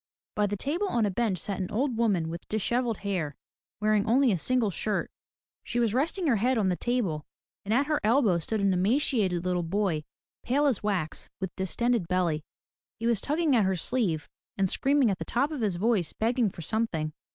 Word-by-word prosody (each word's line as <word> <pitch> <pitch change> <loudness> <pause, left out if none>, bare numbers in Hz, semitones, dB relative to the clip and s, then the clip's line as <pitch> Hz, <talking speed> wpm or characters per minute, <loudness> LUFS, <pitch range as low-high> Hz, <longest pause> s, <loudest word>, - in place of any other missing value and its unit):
By 210 -1 +2
the 205 +1 -3
table 325 - -1
on 235 - +1
a 205 - 0
bench 210 -2 0
sat 195 +3 -4
an 185 - -2
old 255 +3 0
woman 205 -8 +1
with 170 +1 -6
dishevelled 235 +1 0
hair, 170 -8 -1 0.4
wearing 215 0 +2
only 255 +2 +4
a 190 - +1
single 245 +1 +1
shirt. 210 +3 -2 0.5
She 240 - -2
was 230 -3 +2
resting 330 +8 0
her 260 -7 +3
head 250 +5 +2
on 200 -4 +2
the 180 - +1
table, 195 -10 -1 0.4
and 200 - -4
at 265 +5 +3
her 300 0 0
elbow 215 -6 +3
stood 215 +6 -2
an 195 -1 +3
emaciated 190 - +1
little 180 -1 +1
boy, 175 -2 0 0.4
pale 280 +4 +1
as 270 -7 +1
wax, 190 -7 -2
with 190 -2 -4
distended 220 +2 0
belly. 175 -4 +1 0.6
He 230 - -3
was 235 -4 +2
tugging 305 -1 +1
at 225 - +4
her 190 0 +1
sleeve, 175 - -1 0.3
and 195 -1 +2
screaming 270 +3 +2
at 190 - -3
the - - -2
top 275 +6 0
of 295 -5 -4
his 205 -5 0
voice 200 -3 +1
begging 230 0 +1
for 175 - -10
something. 160 -6 -1
215 Hz, 200 wpm, -28 LUFS, 185-245 Hz, 0.6 s, only